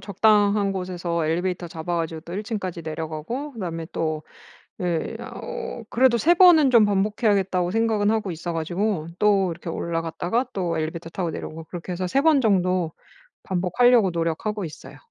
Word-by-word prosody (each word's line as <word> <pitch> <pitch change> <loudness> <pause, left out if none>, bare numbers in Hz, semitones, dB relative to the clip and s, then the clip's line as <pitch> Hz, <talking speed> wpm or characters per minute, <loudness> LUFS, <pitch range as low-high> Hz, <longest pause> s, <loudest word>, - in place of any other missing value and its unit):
적당한 205 0 +3
곳에서 175 -3 -2
엘리베이터 175 +1 -1
잡아 165 +2 -4
가지고 165 -1 -3
또 170 - -10
1 205 +4 -3
층까지 190 -6 -4
내려가고 160 - -5
그다음에 170 -8 -5
또 155 -1 -2 0.6
예 170 -3 -1
어 480 - -6
그래도 250 0 +4
'3 340 +9 +4
번은 340 -6 +7
좀 235 -3 +6
반복해야겠다.'고 195 -3 +1
생각은 220 -1 +2
하고 220 -4 0
있어 170 +1 -4
가지고 175 +1 -1
또 200 -3 +3
이렇게 170 +1 -7
올라갔다가 170 +8 -2
또 175 -4 -1
엘리베이터 165 +1 -4
타고 175 -2 -2
내려오고 160 +1 -7
그렇게 175 +2 -7
해서 180 +1 -2
3 270 +10 +2
번 310 -3 +5
정도 185 -7 +1 0.5
반복하려고 195 +3 +3
노력하고 170 +5 -2
있어요. 155 - -10
185 Hz, 375 characters per minute, -24 LUFS, 165-215 Hz, 0.6 s, 번은